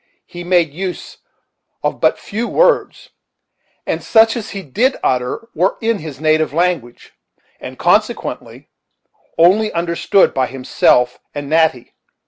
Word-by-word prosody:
He 175 0 -9
made 175 -4 +1
use 185 +2 -6 0.6
of - - -2
but - - +3
few 225 +4 -4
words, - - +1 0.7
and - - -3
such 225 0 +4
as 225 -3 -5
he 195 -2 -7
did 230 - 0
utter 125 - -1
were 180 +5 0
in 225 -1 -1
his 150 -4 -9
native 155 -1 +1
language, 165 -8 -2 0.5
and - - -9
consequently - - -1 0.7
only 200 +6 +4
understood 170 +3 +1
by 130 -1 0
himself 125 -1 +1 0.2
and 145 -1 -5
Natty. 160 -6 +1
170 Hz, 125 wpm, -17 LUFS, 145-205 Hz, 0.7 s, such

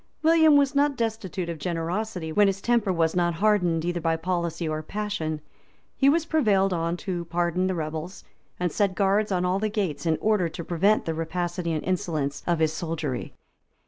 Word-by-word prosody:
William 320 -2 +6
was 280 0 +3
not 285 -1 +2
destitute 215 -6 -2
of 170 -2 -5
generosity, 175 +1 -3
when 205 +5 +4
his 195 0 0
temper 230 -2 +1
was 165 -2 +1
not 175 -1 +1
hardened 180 -4 +2
either 175 0 -1
by 165 0 +1
policy 170 -1 -2
or 155 0 -2
passion: 165 -4 -3 0.5
he 275 - +4
was 320 +2 +2
prevailed 205 - +2
on 170 0 -1
to 175 -2 -4
pardon 175 +2 0
the 185 - -1
rebels, 160 +2 -5 0.4
and 175 -1 0
he - - -12
set 200 -3 +1
guards 200 +2 +2
on 180 -1 +1
all 185 +2 +1
the 215 +1 0
gates, 190 -7 -2
in 160 -1 +2
order 210 -6 +2
to 170 - -7
prevent 190 +6 +2
the 165 - -1
rapacity 170 +1 -2
and 155 -2 -2
insolence 155 -6 -2
of 175 -1 +2
his 160 -1 +1
soldiery. 155 -5 -4
180 Hz, 190 wpm, -26 LUFS, 165-210 Hz, 0.5 s, William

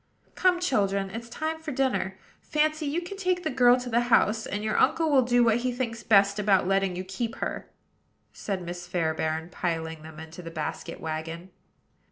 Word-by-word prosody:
"Come, 365 -1 +3
children; 200 - 0
it's 235 +2 -7
time 315 +6 -3
for 315 -2 -5
dinner. 255 -8 0 0.2
Fancy, 310 0 0
you 325 +5 -1
can 395 +3 -7
take 365 -2 0
the 315 - -1
girl 250 -1 +5
to 250 - -6
the 235 -1 +2
house; 220 -1 +3
and 205 +1 -3
your 215 0 -1
uncle 325 -2 +3
will 270 -2 +6
do 245 0 +3
what 225 -1 +4
he 250 +1 -1
thinks 235 -2 -3
best 200 -1 +4
about 195 -3 +3
letting 195 -1 +1
you 185 - -4
keep 205 +5 -4
her," - - -4 0.6
said 195 -3 -4
Miss 175 0 -6
Fairbairn, 160 -1 -1
piling 160 -3 -3
them 160 0 -11
into 160 +2 -9
the 165 - -7
basket 155 -2 -5
wagon. 165 +3 -5
210 Hz, 190 wpm, -27 LUFS, 175-260 Hz, 0.6 s, will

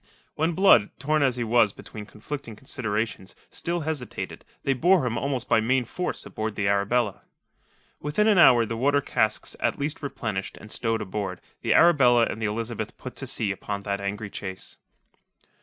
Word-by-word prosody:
When 160 +3 0
Blood, 160 - +5
torn 150 +3 +1
as 130 -3 +3
he 120 - -2
was 115 -2 +3
between 105 -2 -10
conflicting 115 +2 -7
considerations, 110 -5 -3 0.2
still 170 0 -2
hesitated, 155 -5 -4 0.2
they 135 - +2
bore 170 +3 +3
him 120 -2 -1
almost 130 0 -1
by 110 - +4
main 125 +2 +1
force 180 +10 -4
aboard 110 -1 -4
the 100 - 0
Arabella. 100 +2 +1 0.8
Within 150 +9 0
an 205 -4 +5
hour, 120 -8 +7
the 115 - -4
water 140 +5 +2
casks 110 -5 0
at - - 0
least 150 +3 -3
replenished 110 -7 -4
and 105 - -12
stowed 115 -1 -1
aboard, 95 -2 -4 0.2
the - - +2
Arabella 130 -8 +6
and 110 - -5
the 110 - +1
Elizabeth 110 0 -4
put 130 - -8
to 135 - -6
sea 110 -5 -1
upon 100 0 -5
that 100 -1 -2
angry 100 +1 -4
chase. 95 -2 -7
115 Hz, 175 wpm, -26 LUFS, 105-140 Hz, 0.8 s, hour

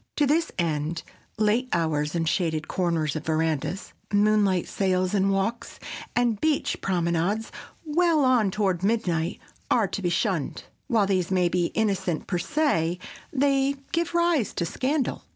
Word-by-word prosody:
To 295 - +3
this 320 +4 +1
end, 160 -1 -1 0.3
late 220 +4 +2
hours 155 -2 0
in 165 -1 0
shaded 160 -2 0
corners 165 -4 0
of 155 - -3
verandas, 160 +3 -1 0.2
moonlight 205 -3 +3
sails 185 -1 0
and 195 -1 +2
walks, 195 +5 -2 0.4
and 240 -4 +1
beach 310 -2 0
promenades 180 +4 0 0.3
well 320 -1 +3
on 245 -6 +4
toward 190 -3 0
midnight, 180 -6 0 0.3
are 225 -4 +3
to 200 - -4
be 175 - 0
shunned. 175 - -1 0.2
While 225 -6 +3
these 185 -3 0
may 180 -2 +2
be 175 0 +1
innocent 195 -6 0
per 180 - -1
se, 180 - +1 0.3
they 275 0 +2 0.2
give 340 +1 -1
rise 340 - +2
to 170 - 0
scandal. 265 - -1
195 Hz, 145 wpm, -26 LUFS, 170-245 Hz, 0.4 s, on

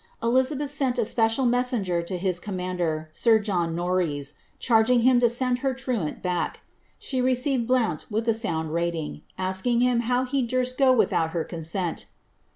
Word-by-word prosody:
Eli 240 +3 +4
zabeth 280 +2 -3
sent 270 -3 0
a - - +1
special 225 +3 +1
messenger 240 -8 +1
to 175 +2 -4
bis 180 -1 -1
commander, 180 -5 -3
sir 225 +7 +4
John 180 -6 -1
Norreys, 170 -5 -1 0.2
charging 235 +1 +3
him 255 0 +5
to 240 -1 +4
send 245 +1 0
her 265 0 -1
Iruani 240 -11 -3
back 180 -2 -1
tu - - -22
her. - - -34 0.3
She 260 -2 -3
received 255 -1 0
Blouni 240 -11 +1
wiih 220 +2 -2
a 230 - +4
sound 160 -8 -2
rating, 170 -3 -2 0.2
asking 190 +6 0
liim 250 -1 +3
how 250 +2 0
he 270 +1 0
durst 255 +1 -1
go 265 -1 +6
without 165 -9 +2
her 165 - 0
consent. 170 +1 -4
225 Hz, 175 wpm, -25 LUFS, 175-250 Hz, 0.3 s, go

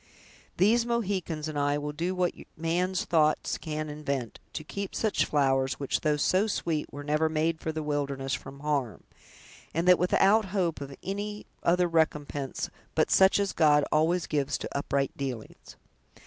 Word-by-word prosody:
These 220 +6 +4
Mohicans 190 -9 -2
and 150 -2 -3
I 145 0 +1
will 145 0 -3
do 170 +5 -2
what 180 -1 +1 0.2
man's 175 +3 0
thoughts 155 -2 +2
can 155 -1 -4
invent, 140 -5 -4
to - - -4
keep 200 +5 -5
such 220 -2 +1
flowers, 135 -2 +2
which, 140 - -1
though 150 -1 +2
so 185 +8 +2
sweet, 165 -7 -2
were 145 +1 -7
never 150 +2 +1
made 160 +1 0
for 160 - -3
the 155 0 -4
wilderness, 140 -2 -2
from 140 +1 -6
harm, 140 -8 -1 0.7
and 165 +2 0
that 180 -1 +7
without 195 +4 +4
hope 180 -5 -1
of 140 -1 -7
any 205 +2 -4 0.2
other 175 +1 +3
recompense 150 -4 -1 0.2
but - - +2
such 190 +1 +5
as 200 -1 0
God 150 -2 +4
always 165 +3 +2
gives 145 -3 -1
to - - -6
upright 140 -1 -1
dealings. 130 -5 -6
155 Hz, 160 wpm, -28 LUFS, 145-180 Hz, 0.7 s, that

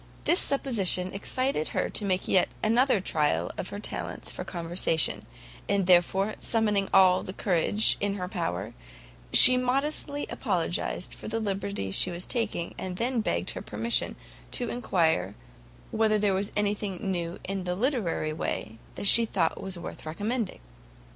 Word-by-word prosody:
This 345 - +4
supposition 200 -10 0
excited 255 - -2
her - - -1
to 210 - 0
make 185 -1 -1
yet 185 - +3
another 235 +1 +3
trial 150 - -1
of - - -5
her - - -7
talents - - -5
for - - -6
conversation, 170 -1 -1 0.4
and 195 -2 +1
therefore, 190 +3 +3
summoning 210 -4 0
all 185 -1 +5
the 185 - -8
courage 195 +3 +3
in 200 0 -1
her 180 -2 -5
power, 165 - -4 0.6
she 255 0 +10
modestly 285 +3 0
apologised 180 -4 -3
for - - -10
the 225 +1 -2
liberty 200 - -4
she 180 - +3
was 175 0 -4
taking, 225 -8 -3
and 185 -1 -5
then 240 +1 -1
begged 85 - -2
her - - -7
permission 110 +2 -1 0.3
to 245 - -2
enquire 165 - 0 0.6
whether 220 -1 +2
there 205 -2 +1
was 195 +2 -1
anything 205 -2 -2
new 170 -1 -4
in 195 -1 -4
the 180 0 -2
literary 205 - -1
way 110 -7 -5 0.2
that - - -5
she 230 +3 +10
thought 170 -6 -1
worth 185 -3 -5
recommending? 205 - -4
195 Hz, 150 wpm, -27 LUFS, 175-220 Hz, 0.6 s, she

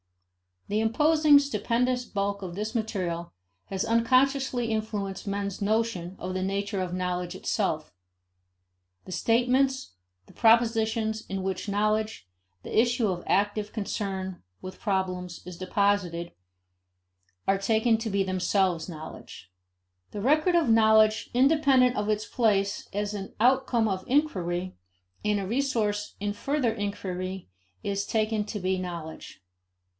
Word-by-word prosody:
The 210 - 0
imposing 300 +6 +5
stupendous 250 -3 0
bulk 200 -1 -2
of 180 -3 -6
this 215 +3 -3
material 180 -7 -3 0.3
has 190 -1 -2
unconsciously 255 +1 +2
influenced 210 -3 -3
men's 200 0 -3
notions 205 -4 0
of 185 +1 -5
the 185 - -2
nature 200 +1 -1
of 180 -1 -3
knowledge 180 -1 -2
itself. 160 -7 -2 1.1
The - - -9
statements, 250 - +1 0.3
the - - -18
propositions, 225 -1 +2
in 195 -1 -3
which 190 +2 -3
knowledge, 215 - 0 0.4
the - - -6
issue 240 -1 +2
of 175 -2 -3
active 205 +2 +1
concern 195 -3 -3 0.2
with 185 0 -8
problems, 185 -4 -2
is 180 -1 -8
deposited, 185 -3 0 1.2
are 195 0 +3
taken 220 +3 +2
to 225 0 -3
be 200 -1 +1
themselves 185 -2 0
knowledge. 155 - -10 0.6
The 205 - -5
record 310 - +3
of 330 -7 +3
knowledge, 220 -1 +4
independent 265 -1 +4
of 210 0 -1
its 215 0 0
place 200 -4 +1
as 205 +1 -2
an 195 -1 -6
outcome 250 -1 +3
of 185 -2 -2
inquiry 185 - 0 0.5
and 210 -1 +1
a 195 - -3
resource 220 -3 -1
in 205 0 -2
further 255 +1 0
inquiry, 190 - -4 0.3
is 200 0 -1
taken 215 -1 0
to 210 0 -5
be 185 0 0
knowledge. 170 -3 -7
205 Hz, 130 wpm, -27 LUFS, 190-230 Hz, 1.2 s, imposing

